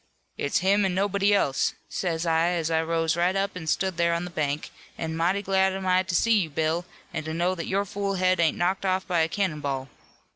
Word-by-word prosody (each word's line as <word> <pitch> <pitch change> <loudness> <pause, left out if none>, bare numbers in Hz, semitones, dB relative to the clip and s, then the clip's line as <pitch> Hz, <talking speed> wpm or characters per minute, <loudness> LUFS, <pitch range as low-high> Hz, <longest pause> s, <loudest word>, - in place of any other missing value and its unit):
"'It's 140 - 0
him 200 +2 +4
an' 190 -2 0
nobody 200 +1 +2
else,' 140 -9 +2
says 170 -2 -2
I, 165 0 +2
as 165 -2 -1
I 160 0 +2
rose 165 0 0
right 175 +2 +1
up 195 +1 0
an' 165 -3 -7
stood 180 +2 0
there 170 0 +2
on 170 +1 -2
the 180 - -8
bank, 150 -2 -2 0.3
'an' 160 0 -3
mighty 180 +5 +1
glad 190 0 +2
am 190 0 -4
I 185 0 +4
to 185 -2 -3
see 225 +4 +4
you 170 -5 -1
Bill, 160 +3 -1 0.3
an' - - -3
to 160 0 -4
know 175 +2 +1
that 170 -3 -5
your 200 +1 0
fool 200 0 -2
head 185 -1 +2
ain't 165 -2 +2
knocked 185 +3 0
off 190 0 0
by 175 -2 0
a 160 - +3
cannon 175 -6 -1
ball.' 135 -2 -3
175 Hz, 235 wpm, -26 LUFS, 160-190 Hz, 0.3 s, him